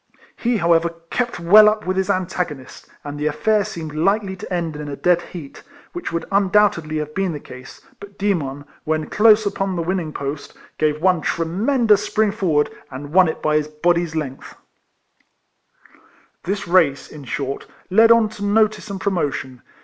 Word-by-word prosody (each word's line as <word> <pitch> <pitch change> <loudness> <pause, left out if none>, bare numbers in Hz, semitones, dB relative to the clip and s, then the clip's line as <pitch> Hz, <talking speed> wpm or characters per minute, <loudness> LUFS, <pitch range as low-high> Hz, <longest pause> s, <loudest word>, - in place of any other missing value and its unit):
He 240 -1 0
however 170 -2 +3 0.2
kept 245 -6 -2
well 210 +5 +7
up 215 0 -3
with 185 +1 -1
his 190 +1 -1
antagonist, 180 -8 -3 0.2
and 145 0 -7
the 150 - 0
affair 210 +7 +1
seemed 160 -5 -7
likely 195 +5 0
to 190 +2 -10
end 170 -3 -2
in 150 0 -6
a 140 - -5
dead 175 +3 +2
heat, 165 -6 -10 0.3
which 350 -1 -5
would 170 0 -3
undoubtedly 195 -5 +2
have 150 0 -4
been 190 -1 -1
the 150 - -5
case, 130 -2 -12 0.2
but 200 0 -13
Demon, 145 -9 -2 0.2
when 155 0 -2
close 215 0 +5
upon 195 -1 -2
the 170 - -2
win 185 +3 -1
ning 160 -4 -4
post, 140 0 -6 0.2
gave 150 -1 +1
one 180 -3 +3
tremendous 210 - +1
spring 215 -1 +1
forward, 165 -8 0 0.2
and 145 +3 -8
won 185 -1 +6
it 160 - -4
by 155 0 +2
his 150 -1 -1
body's 170 +2 0
length. 140 -4 -5 1.9
This 195 0 -3
race, 170 -6 +2
in 150 -2 -10
short, 135 +1 -4 0.2
led 225 +4 +6
on 230 -1 +5
to 210 -1 -9
notice 210 -1 +1
and 195 -1 -5
promotion. 145 -10 -2
175 Hz, 170 wpm, -20 LUFS, 150-200 Hz, 1.9 s, well